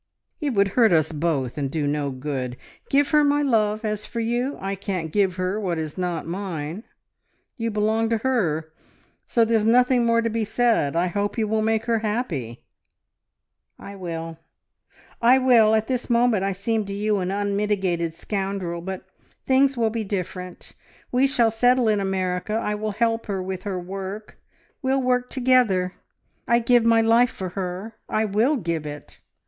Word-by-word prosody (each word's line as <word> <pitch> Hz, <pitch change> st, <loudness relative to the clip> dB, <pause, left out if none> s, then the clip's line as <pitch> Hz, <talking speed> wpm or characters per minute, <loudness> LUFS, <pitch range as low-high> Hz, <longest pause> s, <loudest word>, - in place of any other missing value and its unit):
"It 285 Hz, -6 st, -2 dB
would 200 Hz, 0 st, +3 dB
hurt 225 Hz, +1 st, +4 dB
us 160 Hz, -2 st, +3 dB
both, 150 Hz, -4 st, -1 dB
and 140 Hz, -2 st, -1 dB
do 155 Hz, 0 st, -2 dB
no 145 Hz, 0 st, -1 dB
good. 130 Hz, -2 st, -4 dB, 0.3 s
Give 280 Hz, 0 st, +2 dB
her 300 Hz, -1 st, +5 dB
my 290 Hz, 0 st, +2 dB
love. 215 Hz, -4 st, +1 dB
As 210 Hz, -1 st, -3 dB
for 235 Hz, -, -5 dB
you 240 Hz, +4 st, -1 dB
I 195 Hz, +1 st, -3 dB
can't 185 Hz, -5 st, -4 dB
give 190 Hz, 0 st, +1 dB
her 185 Hz, +3 st, -1 dB
what 180 Hz, -5 st, -2 dB
is 155 Hz, -2 st, -4 dB
not 180 Hz, -3 st, -2 dB
mine.... 175 Hz, 0 st, -5 dB, 0.7 s
You 230 Hz, -1 st, -2 dB
belong 220 Hz, +1 st, +1 dB
to 230 Hz, -, +2 dB
her, 170 Hz, -11 st, -1 dB, 0.5 s
so 230 Hz, -1 st, +3 dB
there's 225 Hz, -1 st, +2 dB
nothing 245 Hz, +2 st, +4 dB
more 230 Hz, 0 st, +2 dB
to -, -, +1 dB
be 225 Hz, 0 st, -1 dB
said.... 220 Hz, -9 st, +1 dB
I 170 Hz, +2 st, +2 dB
hope 205 Hz, +5 st, -2 dB
you 220 Hz, -2 st, +1 dB
will 220 Hz, +1 st, 0 dB
make 220 Hz, 0 st, 0 dB
her 230 Hz, -1 st, +1 dB
happy." 195 Hz, -, -3 dB, 1.1 s
"I 200 Hz, -, -10 dB
will 165 Hz, -3 st, -6 dB, 0.8 s
I 245 Hz, +3 st, +6 dB
will! 235 Hz, -4 st, +5 dB
At 220 Hz, 0 st, +1 dB
this 250 Hz, 0 st, -3 dB
moment 235 Hz, -4 st, +3 dB
I 195 Hz, -, 0 dB
seem 215 Hz, +3 st, -1 dB
to 200 Hz, -, -5 dB
you 210 Hz, 0 st, 0 dB
an 180 Hz, -1 st, -2 dB
unmitigated 200 Hz, -4 st, -1 dB
scoundrel, 190 Hz, -3 st, -3 dB
but 190 Hz, +1 st, -6 dB, 0.4 s
things 270 Hz, 0 st, +3 dB
will 225 Hz, -2 st, +1 dB
be 225 Hz, 0 st, -2 dB
different.... 185 Hz, -2 st, -6 dB, 0.4 s
We 255 Hz, +2 st, +3 dB
shall 240 Hz, -4 st, +2 dB
settle 245 Hz, +2 st, +3 dB
in 210 Hz, -1 st, +2 dB
America. 190 Hz, 0 st, -2 dB
I 220 Hz, -2 st, -1 dB
will 210 Hz, 0 st, -3 dB
help 230 Hz, +1 st, 0 dB
her 195 Hz, -2 st, -2 dB
with 185 Hz, 0 st, -4 dB
her 190 Hz, -3 st, -2 dB
work. 195 Hz, +3 st, -7 dB, 0.4 s
We'll 265 Hz, +1 st, +1 dB
work 250 Hz, -1 st, 0 dB
together. 245 Hz, -8 st, +2 dB, 0.5 s
I'd 235 Hz, -1 st, +2 dB
give 245 Hz, -1 st, +5 dB
my 230 Hz, 0 st, +5 dB
life 230 Hz, +2 st, +4 dB
for 185 Hz, -6 st, -6 dB
her... 185 Hz, +4 st, -5 dB, 0.2 s
I 215 Hz, 0 st, +1 dB
will 220 Hz, +8 st, +2 dB
give 165 Hz, -, -3 dB
it! 145 Hz, -1 st, -9 dB
210 Hz, 175 wpm, -23 LUFS, 180-230 Hz, 1.1 s, I